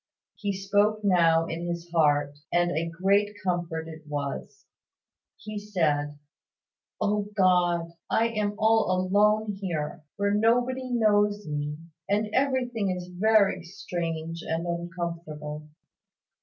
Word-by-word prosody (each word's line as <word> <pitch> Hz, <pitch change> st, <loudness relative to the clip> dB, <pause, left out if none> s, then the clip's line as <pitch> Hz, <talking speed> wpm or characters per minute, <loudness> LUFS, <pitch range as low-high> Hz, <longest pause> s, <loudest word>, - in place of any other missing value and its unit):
He 205 Hz, -2 st, -3 dB
spoke 205 Hz, +2 st, +1 dB
now 165 Hz, -4 st, +4 dB
in 170 Hz, +1 st, -4 dB
his 170 Hz, 0 st, -5 dB
heart; 145 Hz, -3 st, +2 dB, 0.2 s
and 175 Hz, 0 st, +2 dB
a 165 Hz, 0 st, -1 dB
great 200 Hz, +4 st, +1 dB
comfort 175 Hz, -3 st, -2 dB
it 160 Hz, -1 st, -9 dB
was. 145 Hz, -2 st, -5 dB, 0.7 s
He 215 Hz, -1 st, -6 dB
said 150 Hz, -8 st, 0 dB, 0.8 s
"O 205 Hz, 0 st, 0 dB
God, 175 Hz, -3 st, +3 dB, 0.2 s
I 230 Hz, +1 st, +2 dB
am 210 Hz, -2 st, -1 dB
all 220 Hz, -1 st, +3 dB
alone 205 Hz, +3 st, +2 dB
here, 160 Hz, -6 st, -3 dB, 0.2 s
where 200 Hz, 0 st, +1 dB
nobody 245 Hz, +4 st, +2 dB
knows 210 Hz, -4 st, +2 dB
me; 150 Hz, 0 st, -3 dB, 0.3 s
and 210 Hz, +1 st, 0 dB
everything 250 Hz, -6 st, +1 dB
is 180 Hz, -1 st, -4 dB
very 195 Hz, 0 st, +3 dB
strange 165 Hz, -3 st, -4 dB
and 165 Hz, +2 st, -2 dB
uncomfortable. 170 Hz, -3 st, -5 dB
185 Hz, 115 wpm, -27 LUFS, 165-210 Hz, 0.8 s, now